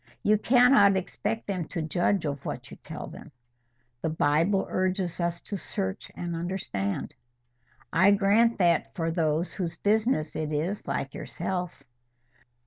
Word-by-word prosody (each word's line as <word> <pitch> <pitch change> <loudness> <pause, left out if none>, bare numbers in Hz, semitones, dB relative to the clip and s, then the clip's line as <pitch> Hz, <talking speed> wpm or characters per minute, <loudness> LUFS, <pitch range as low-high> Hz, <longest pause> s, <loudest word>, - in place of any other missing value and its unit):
"You 210 0 +4
cannot 240 -5 +6
expect 220 +4 -3
them 185 -4 -2
to 165 -4 -3
judge 175 +3 +1
of 145 -2 -3
what - - -6
you - - -10
tell - - -7
them." - - -11 0.7
"The 160 - 0
Bible 160 +5 +2
urges 185 -2 -1
upon 170 - +2
us 170 0 -5
to 200 - -5
search 95 - -4
and 170 -1 -4
understand." 165 - -3 0.8
"I 185 +4 +6
grant 210 +4 +4
that 170 -3 +2
for 165 -2 -1
those 160 0 0
whose 175 -4 -3
business 210 -6 +1
it 155 -1 -2
is, 165 +7 -2
like - - -2
yourself." 180 -6 -4
180 Hz, 145 wpm, -27 LUFS, 160-200 Hz, 0.8 s, cannot